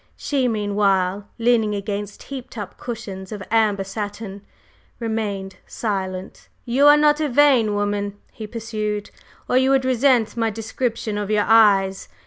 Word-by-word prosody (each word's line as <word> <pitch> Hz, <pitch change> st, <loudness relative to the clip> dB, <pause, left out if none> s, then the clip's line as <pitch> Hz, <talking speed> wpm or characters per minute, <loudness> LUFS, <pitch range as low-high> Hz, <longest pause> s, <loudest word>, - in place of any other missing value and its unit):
She, 270 Hz, -3 st, 0 dB
meanwhile, 200 Hz, -3 st, 0 dB
leaning 225 Hz, -3 st, +2 dB
against 205 Hz, 0 st, -5 dB
heaped 260 Hz, -3 st, -8 dB
up 205 Hz, -3 st, -6 dB
cushions 200 Hz, -6 st, -7 dB
of 205 Hz, -2 st, -6 dB
amber 215 Hz, -3 st, +2 dB
satin, 205 Hz, 0 st, -6 dB, 0.6 s
remained 210 Hz, -4 st, -3 dB
silent. 190 Hz, -3 st, -4 dB, 0.2 s
"You 265 Hz, +4 st, +4 dB
are 295 Hz, 0 st, +8 dB
not 295 Hz, 0 st, +4 dB
a 300 Hz, -, 0 dB
vain 250 Hz, -6 st, +4 dB
woman," 205 Hz, 0 st, -2 dB
he 220 Hz, -, -8 dB
pursued, 215 Hz, -2 st, -4 dB, 0.4 s
"or 250 Hz, -, +2 dB
you 260 Hz, +1 st, +3 dB
would 270 Hz, -1 st, +3 dB
resent 255 Hz, -3 st, +2 dB
my 225 Hz, -1 st, +1 dB
description 225 Hz, 0 st, -3 dB
of 205 Hz, -1 st, -4 dB
your 210 Hz, -1 st, +2 dB
eyes. 200 Hz, -3 st, +4 dB
215 Hz, 140 wpm, -22 LUFS, 200-240 Hz, 0.6 s, are